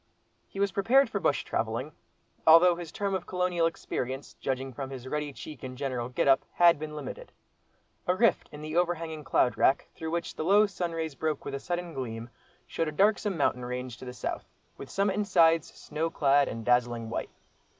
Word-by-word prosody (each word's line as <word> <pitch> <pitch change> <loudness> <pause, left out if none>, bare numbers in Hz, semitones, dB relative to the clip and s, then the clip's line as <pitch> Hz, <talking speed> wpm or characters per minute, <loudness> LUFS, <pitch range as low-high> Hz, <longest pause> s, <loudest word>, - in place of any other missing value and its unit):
He 195 - -9
was 200 -1 +2
prepared 255 +8 +3
for - - -1
bush - - +1
travelling—although 170 +2 +2
his 170 -2 -7
term 200 -1 -2
of 185 -2 -3
"colonial 180 -2 +1
experience," 135 -4 -4
judging 130 0 -3
from 135 +2 -5
his 130 -2 -8
ruddy 150 +1 -2
cheek 150 +1 -10
and 130 -1 -7
general 125 -3 -3
get 125 - 0
up, 135 -1 +5
had 170 -3 +5
been 155 0 -6
limited. - - -7 0.8
A 180 - +3
rift 220 -2 +2
in 150 0 -9
the 155 +1 -5
over 175 0 +3
hanging 160 -2 -6
cloud 125 - +2
wrack, 135 - +3
through 160 - -5
which 170 +1 -2
the - - -3
low 200 +5 +5
sunrays 165 -5 -3
broke 155 +2 -2
with - - -5
a 140 - -2
sudden 175 +1 -4
gleam, 120 -3 -5 0.3
showed 165 - -2
a - - -2
darksome 200 +3 +2
mountain 125 -4 +1
range 125 0 -5
to - - -10
the 125 - -6
south, 120 - -4 0.3
with 135 - -10
summit 195 0 0
and 210 -1 0
sides, 165 -4 +4
snow 155 +2 -3
clad 140 -2 +3
and 115 -1 -5
dazzling 120 -1 +2
white. - - -3
155 Hz, 195 wpm, -29 LUFS, 130-175 Hz, 0.8 s, up